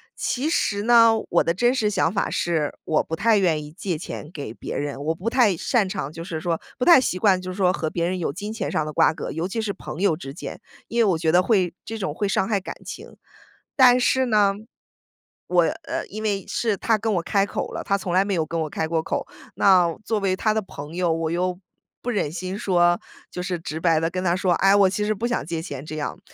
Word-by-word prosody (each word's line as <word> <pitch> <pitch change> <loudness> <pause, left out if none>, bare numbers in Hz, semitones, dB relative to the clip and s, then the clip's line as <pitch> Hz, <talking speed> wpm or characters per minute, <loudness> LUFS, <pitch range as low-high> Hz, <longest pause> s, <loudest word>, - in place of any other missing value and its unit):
其 275 +5 -1
实 205 -9 0
呢， 230 -1 +6 0.2
我 170 - +3
的 170 - +1
真 240 +7 +2
实 215 -5 +1
想 185 -2 +1
法 200 - 0
是， 160 -4 -1
我 155 - +2
不 160 - -4
太 220 +3 +3
愿 160 -5 +1
意 150 - -10
借 170 0 -3
钱 150 - -7
给 140 -9 -7
别 - - -6
人。 145 -1 -4
我 160 +1 0
不 190 +7 -7
太 230 -8 +3
擅 210 -3 +1
长 185 -8 -4
就 165 - -7
是 160 -2 -5
说 165 0 -2 0.2
不 250 - -1
太 335 -7 +8
习 185 - -1
惯 190 -3 +3
就 185 - -6
是 185 - -8
说 185 -1 +3
和 155 -2 -2
别 170 0 -1
人 185 0 -2
有 160 - -1
金 210 +6 -6
钱 215 -4 -3
上 155 - 0
的 155 - -5
瓜 - - +4
葛， - - -5
尤 165 +3 -2
其 225 +4 -4
是 200 -2 -2
朋 160 - -8
友 195 -5 +3
之 135 -5 -8
间。 160 - -8 0.3
因 235 - -2
为 - - +6
我 165 - +1
觉 160 0 +1
得 180 +1 +5
会 185 -4 +1
这 225 +1 -5
种 170 -8 -3
会 205 +4 -1
伤 190 0 +1
害 205 -3 +1
感 - - -7
情。 - - -9 0.6
但 250 -2 +6
是 260 +1 +2
呢， 205 -3 +3 0.9
我 175 -1 +4
呃， - - -3
因 215 +2 -7
为 200 -2 -1
是 220 -4 0
他 225 -2 +2
跟 220 0 -1
我 175 - +1
开 200 +1 +2
口 - - -4
了， - - -4
他 200 - +1
从 185 -2 -5
来 190 +2 +4
没 200 - -1
有 160 -3 0
跟 165 +1 -3
我 155 - -2
开 160 - -2
过 160 -1 0
口。 - - -3 0.3
那 180 -4 +4
作 220 -2 0
为 190 -2 +1
他 215 +2 +1
的 220 - 0
朋 150 -4 -9
友， 175 -2 +1
我 165 0 -2
又 180 +1 -1 0.4
不 245 - -4
忍 205 -10 0
心 185 +3 -4
说 175 -3 +2 0.3
就 180 - -5
是 180 -1 -2
直 160 -1 -5
白 165 -2 +3
地 165 +1 0
跟 185 +1 -3
他 175 -1 +2
说： 185 -1 0
“哎， 195 +1 +4
我 195 -2 +5
其 210 +2 -1
实 215 - +1
不 230 - -3
想 245 - -2
借 165 -1 -3
钱。” 145 -5 -7
这 155 - -6
样。 150 - -4
185 Hz, 275 characters per minute, -23 LUFS, 165-210 Hz, 0.9 s, 太